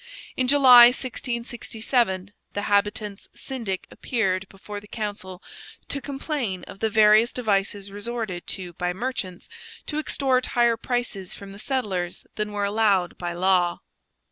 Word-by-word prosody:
In 255 Hz, -, +1 dB
July 255 Hz, -3 st, +9 dB
1667, 235 Hz, -5 st, -1 dB, 0.2 s
the 205 Hz, -, -2 dB
habitants' 205 Hz, 0 st, 0 dB
syndic 230 Hz, -9 st, -4 dB
appeared 195 Hz, -5 st, -1 dB
before 205 Hz, +1 st, -8 dB
the 205 Hz, -, -16 dB
council 205 Hz, -4 st, -5 dB, 0.5 s
to 280 Hz, -, -3 dB
complain 270 Hz, -, -3 dB
of -, -, -11 dB
the 220 Hz, -, +1 dB
various 215 Hz, +1 st, +5 dB
devices 200 Hz, -3 st, -1 dB
resorted 205 Hz, -3 st, -4 dB
to 180 Hz, -3 st, -4 dB
by 180 Hz, +2 st, -2 dB
merchants 190 Hz, -4 st, -4 dB, 0.4 s
to 300 Hz, -, -2 dB
extort 265 Hz, -4 st, +1 dB
higher 235 Hz, -1 st, +5 dB
prices 230 Hz, -5 st, -3 dB
from 200 Hz, -1 st, -10 dB
the 200 Hz, -, -11 dB
settlers 195 Hz, -10 st, -2 dB
than 210 Hz, -1 st, -3 dB
were 205 Hz, -1 st, -1 dB
allowed 200 Hz, -4 st, +2 dB
by 175 Hz, -1 st, -3 dB
law. 180 Hz, -1 st, +2 dB
210 Hz, 135 wpm, -25 LUFS, 190-240 Hz, 0.5 s, July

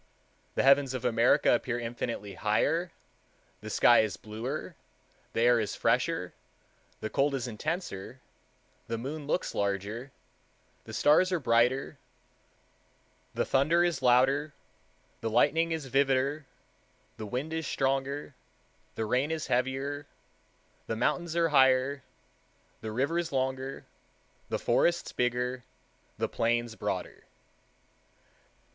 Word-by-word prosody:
The -, -, +2 dB
heavens 135 Hz, -1 st, +4 dB
of 130 Hz, -, -5 dB
America 115 Hz, 0 st, +4 dB
appear 120 Hz, 0 st, 0 dB
infinitely 115 Hz, -3 st, -4 dB
higher, 125 Hz, -, +1 dB, 0.7 s
the 110 Hz, -, -8 dB
sky 120 Hz, +3 st, +5 dB
is 110 Hz, -2 st, 0 dB
bluer, 110 Hz, +4 st, -5 dB, 0.6 s
the -, -, 0 dB
air 120 Hz, 0 st, +5 dB
is 105 Hz, -4 st, -2 dB
fresher, -, -, 0 dB, 0.7 s
the 110 Hz, -, -3 dB
cold 140 Hz, 0 st, +1 dB
is 130 Hz, -2 st, -3 dB
intenser, 125 Hz, -, -4 dB, 0.7 s
the 115 Hz, -, -2 dB
moon 140 Hz, +5 st, -6 dB
looks 180 Hz, -, -1 dB
larger, 100 Hz, +6 st, -2 dB, 0.7 s
the -, -, -9 dB
stars 180 Hz, +5 st, +4 dB
are 180 Hz, -, +1 dB
brighter 125 Hz, +1 st, +1 dB, 1.4 s
the -, -, 0 dB
thunder 155 Hz, +6 st, +3 dB
is 170 Hz, -6 st, 0 dB
louder, 135 Hz, +4 st, +3 dB, 0.6 s
the 115 Hz, -, -2 dB
lightning 155 Hz, +8 st, +3 dB
is 160 Hz, -4 st, -3 dB
vivider, 135 Hz, +2 st, +1 dB, 0.7 s
the 110 Hz, -, -6 dB
wind 135 Hz, +8 st, -3 dB
is 160 Hz, -1 st, -2 dB
stronger, 135 Hz, +2 st, -1 dB, 0.6 s
the 110 Hz, -, -2 dB
rain 125 Hz, +7 st, +1 dB
is 160 Hz, -1 st, -2 dB
heavier, 135 Hz, +3 st, -1 dB, 0.8 s
the 115 Hz, -, -2 dB
mountains 165 Hz, +8 st, -1 dB
are 170 Hz, -1 st, +3 dB
higher, 130 Hz, -1 st, +4 dB, 0.8 s
the 110 Hz, -, -5 dB
rivers 165 Hz, +8 st, -1 dB
longer, 130 Hz, 0 st, -2 dB, 0.6 s
the -, -, 0 dB
forests 170 Hz, 0 st, +1 dB
bigger, 125 Hz, +1 st, -1 dB, 0.5 s
the -, -, 0 dB
plains 120 Hz, 0 st, 0 dB
broader." -, -, -4 dB
130 Hz, 115 wpm, -29 LUFS, 120-145 Hz, 1.4 s, sky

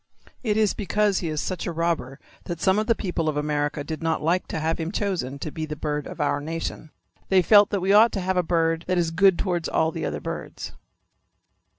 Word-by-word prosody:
It 215 Hz, -4 st, 0 dB
is 215 Hz, -2 st, +3 dB
because 210 Hz, -1 st, +1 dB
he 170 Hz, -, -3 dB
is 155 Hz, -1 st, -2 dB
such 185 Hz, -3 st, -4 dB
a -, -, -1 dB
robber 165 Hz, -5 st, -2 dB, 0.3 s
that 170 Hz, -2 st, -5 dB
some 190 Hz, +4 st, +3 dB
of 215 Hz, -, -2 dB
the 230 Hz, -, +3 dB
people 175 Hz, -6 st, -2 dB
of 150 Hz, -, -2 dB
America 150 Hz, 0 st, -1 dB
did 155 Hz, +2 st, -6 dB
not 165 Hz, -1 st, -1 dB
like 175 Hz, +4 st, +1 dB
to -, -, -3 dB
have 160 Hz, +2 st, -1 dB
him 165 Hz, +1 st, -3 dB
chosen 185 Hz, -11 st, -2 dB
to 150 Hz, +2 st, -5 dB
be 155 Hz, +1 st, -4 dB
the 150 Hz, -, -4 dB
bird 150 Hz, -1 st, -3 dB
of -, -, -9 dB
our 145 Hz, -, 0 dB
nation. 160 Hz, 0 st, -5 dB, 0.4 s
They 190 Hz, -1 st, +4 dB
felt 205 Hz, +2 st, +6 dB
that 200 Hz, -3 st, -1 dB
we 190 Hz, +2 st, +2 dB
ought 220 Hz, +3 st, +7 dB
to 200 Hz, -, -1 dB
have 185 Hz, +1 st, -1 dB
a 180 Hz, -, +3 dB
bird 165 Hz, -1 st, 0 dB
that 185 Hz, 0 st, +1 dB
is 170 Hz, -2 st, +1 dB
good 190 Hz, +1 st, +4 dB
towards 175 Hz, -3 st, -1 dB
all 160 Hz, 0 st, +1 dB
the 165 Hz, -2 st, -3 dB
other -, -, -3 dB
birds. -, -, -6 dB
170 Hz, 235 wpm, -24 LUFS, 155-190 Hz, 0.4 s, ought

